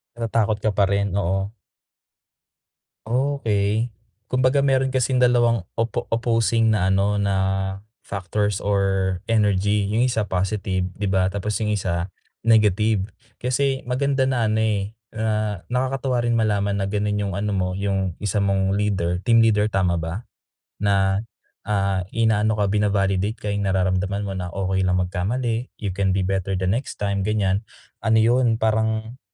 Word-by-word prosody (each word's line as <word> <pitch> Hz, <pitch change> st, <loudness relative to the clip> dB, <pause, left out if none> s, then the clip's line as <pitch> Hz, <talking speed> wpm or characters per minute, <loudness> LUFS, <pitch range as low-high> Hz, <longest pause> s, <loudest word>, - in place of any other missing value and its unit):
Natatakot 115 Hz, -2 st, 0 dB
ka 110 Hz, -, +2 dB
pa 100 Hz, -, +3 dB
rin? 100 Hz, -1 st, 0 dB
Oo. 95 Hz, +2 st, -1 dB, 1.5 s
Okey, 115 Hz, -4 st, 0 dB, 0.3 s
kumbaga 130 Hz, +3 st, +2 dB
meron 135 Hz, -1 st, +2 dB
kasing 130 Hz, 0 st, +1 dB
dalawang 120 Hz, -4 st, +3 dB, 0.2 s
opo 115 Hz, 0 st, -1 dB
opposing 115 Hz, -1 st, +2 dB
na 95 Hz, -2 st, +1 dB
ano, 100 Hz, +2 st, +2 dB
na 100 Hz, -1 st, +1 dB, 0.7 s
factors 100 Hz, +1 st, -2 dB
or 95 Hz, -2 st, 0 dB
energy, 105 Hz, -2 st, +2 dB
yung 110 Hz, +3 st, +1 dB
1, 120 Hz, -4 st, +1 dB
positive, 95 Hz, 0 st, -1 dB
di 105 Hz, -, -2 dB
ba. 95 Hz, -1 st, +2 dB
Tapos 100 Hz, +1 st, -3 dB
yung 105 Hz, -, 0 dB
1, 90 Hz, -3 st, -1 dB, 0.3 s
negative. 105 Hz, -2 st, +3 dB, 0.3 s
Kasi 135 Hz, +2 st, 0 dB
maganda 135 Hz, +1 st, +1 dB
na 120 Hz, -5 st, +1 dB
ano 110 Hz, -, +1 dB
eh, 105 Hz, -2 st, 0 dB, 0.2 s
na 105 Hz, -3 st, -1 dB
nakakatuwa 130 Hz, 0 st, 0 dB
rin 120 Hz, -, +1 dB
malaman 105 Hz, -3 st, +1 dB
na 95 Hz, -, -1 dB
ganun 105 Hz, 0 st, -1 dB
yung 100 Hz, -2 st, -2 dB
ano 105 Hz, 0 st, -1 dB
mo, 90 Hz, -1 st, 0 dB
yung 95 Hz, -3 st, -1 dB
isa 105 Hz, 0 st, 0 dB
mong 95 Hz, -1 st, +1 dB
leader, 95 Hz, -4 st, 0 dB
team 115 Hz, +3 st, +4 dB
leader, 105 Hz, -1 st, +3 dB
tama 95 Hz, -4 st, +1 dB
ba? 85 Hz, +8 st, -5 dB, 0.5 s
Na, 100 Hz, -1 st, +2 dB, 0.5 s
ah, 100 Hz, -2 st, +1 dB
inaano 110 Hz, -1 st, +2 dB
ka, 105 Hz, -, +2 dB
bina-validate 100 Hz, 0 st, +1 dB
ka, 105 Hz, -, -4 dB
yung 100 Hz, -1 st, -1 dB
nararamdaman 95 Hz, +1 st, 0 dB
mo 100 Hz, -, -4 dB
na 90 Hz, -2 st, -4 dB
okey 95 Hz, +1 st, -1 dB
lang 90 Hz, -, +2 dB
magkamali, 115 Hz, +7 st, -2 dB
you 100 Hz, -3 st, -3 dB
can 95 Hz, +1 st, 0 dB
be 95 Hz, -, +1 dB
better 95 Hz, 0 st, -1 dB
the 95 Hz, -, -2 dB
next 115 Hz, +8 st, -1 dB
time, 100 Hz, -1 st, -1 dB
ganiyan, 100 Hz, -2 st, +1 dB, 0.4 s
ano 110 Hz, -1 st, +1 dB
yun, 115 Hz, +1 st, +3 dB
parang 110 Hz, +2 st, -1 dB
105 Hz, 150 wpm, -23 LUFS, 95-115 Hz, 1.5 s, team